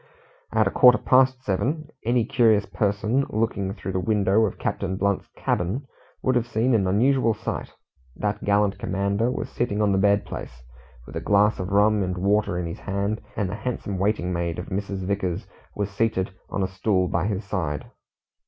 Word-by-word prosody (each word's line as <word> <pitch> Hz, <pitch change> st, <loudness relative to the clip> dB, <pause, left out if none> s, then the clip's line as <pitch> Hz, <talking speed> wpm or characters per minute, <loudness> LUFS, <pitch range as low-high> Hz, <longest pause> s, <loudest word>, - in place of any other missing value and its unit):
At -, -, +3 dB
a -, -, 0 dB
quarter 125 Hz, 0 st, +7 dB
past 130 Hz, 0 st, +3 dB
seven, 145 Hz, -, -1 dB
any 120 Hz, 0 st, +2 dB
curious 115 Hz, -5 st, +3 dB
person 105 Hz, +6 st, 0 dB
looking 105 Hz, -3 st, -1 dB
through 95 Hz, -, -5 dB
the 95 Hz, -, -1 dB
window 105 Hz, +2 st, +2 dB
of -, -, -7 dB
Captain 95 Hz, -1 st, -2 dB
Blunt's 100 Hz, 0 st, 0 dB
cabin 100 Hz, +11 st, -1 dB, 0.4 s
would 130 Hz, -, +2 dB
have 120 Hz, -1 st, +1 dB
seen 120 Hz, +2 st, +1 dB
an 100 Hz, -5 st, +3 dB
unusual 115 Hz, +3 st, +3 dB
sight. -, -, -5 dB, 0.4 s
That 105 Hz, -1 st, -2 dB
gallant 100 Hz, -1 st, +2 dB
commander 100 Hz, +4 st, 0 dB
was 125 Hz, -, -3 dB
sitting 120 Hz, -4 st, -1 dB
on 105 Hz, -1 st, +3 dB
the 95 Hz, -, +2 dB
bed 100 Hz, +1 st, +3 dB
place, 65 Hz, -1 st, -8 dB, 0.4 s
with -, -, -11 dB
a -, -, -3 dB
glass 105 Hz, +1 st, +3 dB
of 95 Hz, 0 st, -3 dB
rum 105 Hz, +1 st, +4 dB
and 90 Hz, -1 st, -2 dB
water 100 Hz, -1 st, +1 dB
in 90 Hz, -, -2 dB
his 85 Hz, -, -6 dB
hand, 100 Hz, +2 st, -2 dB
and 105 Hz, -, 0 dB
the 90 Hz, -, -5 dB
handsome 105 Hz, -4 st, -4 dB
waiting 95 Hz, -2 st, 0 dB
maid 85 Hz, -1 st, -2 dB
of 90 Hz, -, -6 dB
Mrs. 100 Hz, -1 st, -3 dB
Vickers 95 Hz, -3 st, -2 dB, 0.3 s
was 100 Hz, -1 st, -2 dB
seated 100 Hz, -3 st, 0 dB, 0.2 s
on 100 Hz, -, -1 dB
a -, -, +1 dB
stool 95 Hz, 0 st, 0 dB
by 85 Hz, +2 st, 0 dB
his 105 Hz, -1 st, -2 dB
side. 85 Hz, -8 st, -2 dB
100 Hz, 185 wpm, -24 LUFS, 95-110 Hz, 0.4 s, quarter